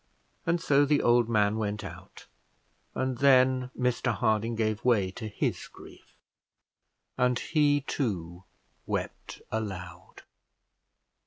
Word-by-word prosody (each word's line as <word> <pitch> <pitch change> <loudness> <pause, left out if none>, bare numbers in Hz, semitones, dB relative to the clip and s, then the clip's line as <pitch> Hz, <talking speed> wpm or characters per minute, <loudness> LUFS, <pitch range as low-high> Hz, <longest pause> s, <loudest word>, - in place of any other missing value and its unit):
And 170 +1 +2
so 145 -3 +3
the 145 0 +2
old 120 -1 +4
man 105 -1 +2
went 105 -1 -3
out, - - -11 0.7
and 130 -2 -2
then 130 -2 +4
Mr 125 0 0
Harding 110 0 0
gave 110 -1 -1
way 105 -7 +2
to 110 +3 -7
his 105 - -3
grief - - -16 1.0
and 125 0 +3
he 145 -1 +2
too 90 - -4 0.4
wept - - -5
aloud. 95 -5 -6
120 Hz, 110 wpm, -28 LUFS, 105-130 Hz, 1.0 s, old